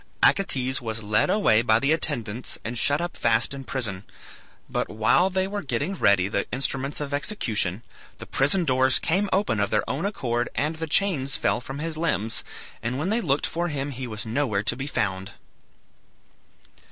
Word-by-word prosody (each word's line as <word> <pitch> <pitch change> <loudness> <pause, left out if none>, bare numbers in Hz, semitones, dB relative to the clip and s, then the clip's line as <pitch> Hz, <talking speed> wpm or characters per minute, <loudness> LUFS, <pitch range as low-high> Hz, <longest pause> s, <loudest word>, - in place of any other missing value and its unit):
Acetes 130 -9 +2
was 115 -1 -5
led 105 +1 +2
away 155 - +4
by 110 -2 +4
the 140 +5 +1
attendants 125 -8 -1
and 115 +3 -3
shut 145 +5 +3
up 175 0 -3
fast 115 +2 +1
in 135 -1 -6
prison; 110 -8 -3 0.6
but - - -2
while 110 - +3
they 190 0 +1
were 205 +1 -3
getting 130 +5 -1
ready 100 - +3
the 100 -1 -1
instruments 135 +2 0
of 145 -1 -4
execution 115 - -1 0.3
the - - -9
prison 155 +7 +2
doors 130 -1 +4
came 195 +5 +1
open 190 - +1
of 100 -1 +1
their - - 0
own 140 - -1
accord 120 - -1
and 155 +3 -1
the 160 0 -3
chains 150 -7 +1
fell 120 - 0
from 135 +3 -7
his 160 +1 -4
limbs, 115 -9 -1 0.4
and 120 +3 -2
when 155 +7 -1
they 225 +3 +1
looked 145 -6 +1
for 170 +1 -1
him 145 -2 -3
he 130 -1 -5
was 110 -1 -5
nowhere 110 -3 0
to 110 - 0
be 135 +2 -5
found. 100 -7 -2
130 Hz, 180 wpm, -25 LUFS, 110-160 Hz, 0.6 s, away